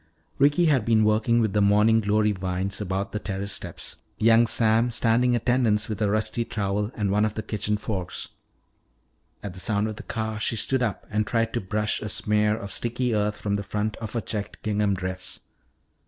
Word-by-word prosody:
Ricky 145 +5 +4
had 140 -8 +3
been 110 -1 +3
working 110 +2 +3
with 110 -3 0
the 105 - +2
morning 105 +3 +4
glory 105 +1 +2
vines 95 +1 -2
about 95 +1 -2
the 105 - -3
terrace 100 -1 -4
steps, - - -6 0.2
young 115 +1 +5
Sam 115 +1 +3
standing 120 +1 +2
attendance 115 -3 +2
with 110 0 -4
a 105 - +2
rusty 110 +3 0
trowel 105 -1 -2
and 105 -3 -1
one 105 +1 +2
of 110 -1 0
the 110 - -3
kitchen 105 0 -1
forks. 95 -4 -4 1.1
At 100 -3 -5
the 90 - -10
sound 105 +1 0
of 110 -1 -6
the - - -7
car 110 -3 -4
she 110 - -1
stood 130 +4 0
up 115 -6 -2
and 105 0 0
tried 115 0 0
to 120 - -1
brush 105 +3 -1
a 105 - -4
smear 105 +1 +1
of 100 -3 -7
sticky 120 +1 -1
earth 105 0 0
from 100 -1 -1
the 100 - -4
front 105 +2 -2
of 110 -2 -7
her 115 - -1
checked 105 0 -5
gingham 105 -2 +1
dress. 90 0 -5
105 Hz, 200 wpm, -25 LUFS, 100-115 Hz, 1.1 s, young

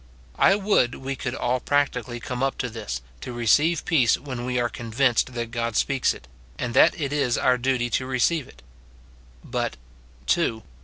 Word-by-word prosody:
I 195 - +6
would 200 - +2
we 135 +1 -4
could 125 0 -4
all 125 +1 0
practically 125 -4 0
come 125 +1 -5
up 135 0 0
to 125 - -2
this, 105 - -5 0.2
to 125 - -7
receive 135 +8 +2
peace 130 -9 +3
when 130 -3 -6
we 125 0 0
are 120 - +2
convinced 120 +2 0
that 115 -1 -3
God 115 -2 -2
speaks 135 +2 +2
it, 65 - -10 0.3
and 120 -1 -3
that 185 - +5
it 145 -2 -2
is 135 -5 +1
our 125 -1 +2
duty 125 -1 +1
to 130 - 0
receive 130 +3 +1
it. 65 - -18 0.8
But, - - -3 0.3
— 60 +1 -27
(2.) 115 -10 +1
125 Hz, 185 wpm, -24 LUFS, 120-135 Hz, 0.8 s, I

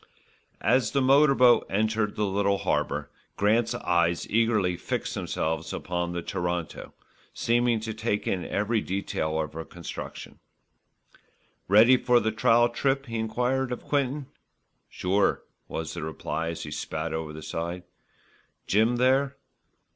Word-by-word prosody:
As 125 -3 +3
the 140 - +3
motor 135 +2 +5
boat 125 -2 +5
entered 110 +1 0
the 105 - 0
little 100 0 +1
harbour, 75 -5 -1 0.3
Grant's 115 +3 +2
eyes 85 -5 +1
eagerly 110 -5 +2
fixed 90 - -3
themselves 80 +1 -2
upon 85 0 -3
the 85 -1 -4
Toronto, 85 -1 -4 0.4
seeming 120 -1 +2
to 110 0 -4
take 110 -1 -2
in 90 -2 -1
every 105 +2 0
detail 80 -5 -2
of 75 -1 -3
her 80 +1 -5
construction. 85 0 -8 1.3
"Ready 110 +6 +7
for 125 -1 +3
the 110 -1 0
trial 115 +2 +4
trip?" 135 +3 0
he 115 -2 -4
enquired 125 +4 -1
of 125 - -4
Quinton. 140 0 -1 0.6
"Sure," 95 +2 +1 0.2
was - - -5
the - - -5
reply 80 +1 -3
as 85 0 -4
he - - -7
spat 80 +1 -4
over 80 -1 -3
the 75 0 -9
side. 85 +3 -4 0.8
"Jim 110 +4 +3
there?" 130 +3 +2
105 Hz, 140 wpm, -27 LUFS, 85-120 Hz, 1.3 s, Ready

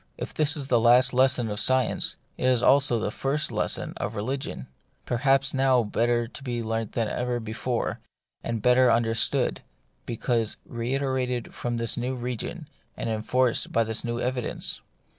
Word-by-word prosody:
If - - -6
this 155 0 +1
is 140 - -4
the 125 -3 +3
last 125 +3 +5
lesson 130 -2 +3
of 105 - -3
science, 130 +3 +1 0.2
it - - -3
is 125 -2 +3
also 140 -3 +4
the 105 - -2
first 140 +6 -1
lesson - - 0
of - - -4
religion; 125 - -4 0.4
perhaps 135 +2 +2
now 130 -2 +3
better 120 +2 0
to 135 - -8
be 120 -3 -3
learnt 115 -1 -3
than 115 -2 0
ever 125 +2 -2
before, 115 +2 -3 0.4
and 115 -3 -3
better 125 0 +5
understood, 115 -1 +1 0.5
because 115 -1 -1
reiterated 125 0 -2
from 120 -1 -3
this 115 -1 -1
new 125 +2 -2
region, 125 -1 -5 0.3
and 115 - -2
enforced 120 +3 0
by 115 - +3
this 110 0 -3
new 120 -1 -3
evidence. 125 -1 -3
120 Hz, 160 wpm, -26 LUFS, 115-130 Hz, 0.5 s, last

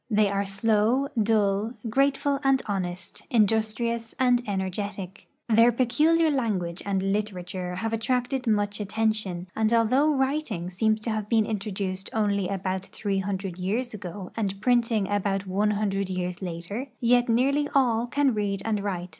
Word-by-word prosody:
They 210 -2 +3
are 200 0 0
slow, 220 +6 +2
dull, 210 0 +1
grateful 275 +3 +1
and 270 -1 +4
honest, 180 -3 -4
industrious 225 +1 +1
and 250 -2 +4
energetic. 190 -1 -4 0.2
Their 230 +1 +5
peculiar 305 +7 +3
language 195 -10 -1
and 195 -1 0
literature 185 -3 -3
have 225 +4 -3
attracted 250 +2 -1
much 205 -1 +1
attention, 210 -3 -1
and 220 0 +1
although 240 +6 +3
writing 265 - -1
seems 215 +3 +1
to 225 - -2
have 215 -1 -3
been 225 -2 +3
introduced 195 -3 -4
onl}' 200 -3 +1
al)out 190 -1 -2
three 195 -2 -2
hundi*ed 190 -2 -4
years 225 +7 -2
ago 190 -2 -7
and 200 -3 -2
printing 230 -3 +2
about 200 -1 -1
one 200 +3 +1
hundred 200 -2 -1
years 180 -1 -3
later, 185 +8 -5
yet 245 0 +3
nearly 275 +5 +2
all 240 -3 +3
can 275 +1 +2
read 200 -2 -2
and 220 -2 0
write. 180 -3 -3
210 Hz, 145 wpm, -26 LUFS, 195-235 Hz, 0.2 s, Their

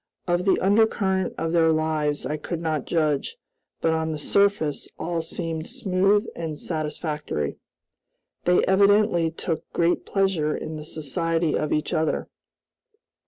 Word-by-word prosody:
Of 175 +1 +1
the 195 - +3
undercurrent 195 -2 +2
of 165 0 -1
their 165 -1 +4
lives 155 -2 0
I 150 - -1
could 160 +2 -4
not 160 -2 -2
judge, 155 - 0 0.4
but 165 - +2
on 160 0 -1
the 155 - -3
surface 200 -2 +1
all 170 -1 -2
seemed 165 -1 -4
smooth 205 -4 +2
and 160 -3 -4
satisfactory. 150 - -3 0.9
They 180 0 +4
evidently 200 -3 +4
took 165 0 -3
great 170 +1 +2
pleasure 190 -6 +1
in 155 - -6
the 150 - -8
society 165 +2 -1
of 150 - -1
each 150 - 0
other. 160 0 0
165 Hz, 135 wpm, -24 LUFS, 155-190 Hz, 0.9 s, their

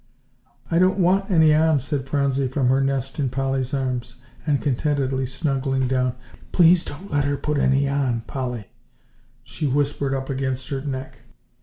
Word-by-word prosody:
"I 165 - +3
don't 185 +1 +3
want 195 +2 +2
any 160 -4 +5
on," 155 -1 +3
said 135 0 -3
Phronsie 140 -2 +1
from 130 -1 0
her 135 +1 +3
nest 135 +1 -2
in 135 -3 +1
Polly's 135 0 -1
arms, 125 -3 -2 0.3
and 145 -2 +2
contentedly 135 -1 0
snuggling 135 -1 -1
down. 130 -1 0 0.4
"Please 175 0 +5
don't 185 +8 -9
let 145 -1 +1
her 140 0 0
put 145 +1 -1
any 135 +1 +3
on, 135 -4 0
Polly," 125 -4 -5 0.7
she 155 - -3
whispered 140 0 0
up 135 0 -4
against 130 -1 -3
her 135 -2 -2
neck. 135 -2 -5
135 Hz, 160 wpm, -23 LUFS, 130-145 Hz, 0.7 s, any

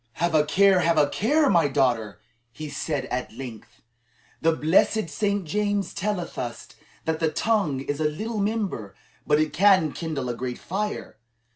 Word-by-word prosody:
"Have 170 +5 -1
a 155 -1 +5
care, 195 +4 +4
have 170 -1 +2
a 150 -1 +5
care, 290 - +2
my 170 - +4
daughter!" 115 -8 0 0.3
he 155 +5 -7
said 140 -1 -3
at 125 -3 -3
length. 120 -5 -10 0.6
"The 165 - +4
blessed 165 +3 +2
Saint 200 +2 -1
James 205 +4 -1
telleth 185 -3 -3
us 120 -2 -5 0.4
that 160 0 -1
the 160 - +2
tongue 180 -9 0
is 145 +2 -3
a 155 - 0
little 215 +8 -4
member, 200 - -2 0.3
but 150 0 +4
it 155 0 0
can 185 -4 +4
kindle 155 -6 -4
a 120 - -1
great 125 0 -4
fire. 205 - -4
160 Hz, 165 wpm, -25 LUFS, 140-200 Hz, 0.6 s, a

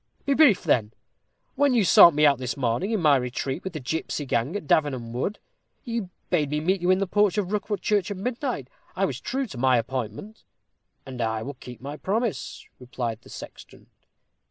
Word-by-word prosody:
"Be 280 - +2
brief, 275 - +5
then. 115 -9 +1 0.6
When 285 -3 +2
you 225 - +4
sought 170 -2 +8
me 150 0 +4
out 140 -3 +4
this 130 +2 -4
morning, 125 - 0
in 220 -2 0
my 150 -4 +5
retreat 130 +4 -3
with 190 - -5
the 155 - -4
gipsy 150 +2 -3
gang 125 - -1
at 205 - -4
Davenham 130 -6 +1
Wood, 135 - -2 0.5
you 230 -7 -3 0.2
bade 155 -5 +2
me 150 +1 -1
meet 185 +4 0
you 175 - 0
in 185 - +5
the 195 - 0
porch 205 +1 +2
of 195 -2 -1
Rookwood 205 0 -2
Church 205 -4 +1
at 200 - -4
midnight. 250 +5 -3 0.3
I - - +1
was - - -4
true 270 +1 -2
to 145 - -9
my 130 0 +4
appointment." 130 - -5 0.6
"And 130 -3 -6
I 110 -1 -1
will 140 - -5
keep 125 -2 -12
my 145 +3 -6
promise," 220 +5 -2
replied 120 -3 -5
the - - -17
sexton. - - -12
155 Hz, 200 wpm, -25 LUFS, 125-205 Hz, 0.6 s, sought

